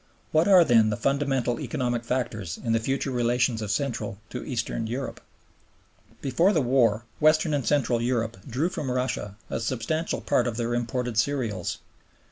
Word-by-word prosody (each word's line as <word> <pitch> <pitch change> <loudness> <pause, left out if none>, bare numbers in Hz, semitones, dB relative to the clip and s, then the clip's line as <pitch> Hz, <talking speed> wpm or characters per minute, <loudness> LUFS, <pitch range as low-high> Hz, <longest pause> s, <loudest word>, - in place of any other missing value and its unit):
What 160 +3 +3
are 185 -3 +8
then 115 -4 +5
the 105 - -1
fundamental 135 -4 0
economic 120 -5 -2
factors 110 -8 -2
in 115 - -3
the 115 - +3
future 135 +4 -1
relations 120 -1 +1
of 105 - -4
Central 115 -5 -2
to 125 - -5
Eastern 120 -3 -2
Europe? 130 +4 -4 1.0
Before 165 +9 +3
the 160 - +3
war 120 -4 +2
Western 155 +1 +4
and 140 -2 0
Central 130 -5 +2
Europe 115 -3 -1
drew 140 +9 0
from 145 -6 -4
Russia 125 -5 -2 0.2
a - - -1
substantial 130 +8 -2
part - - +1
of 115 -2 -3
their 120 0 -1
imported 120 -1 -1
cereals. 115 -8 -1
125 Hz, 160 wpm, -26 LUFS, 115-140 Hz, 1.0 s, are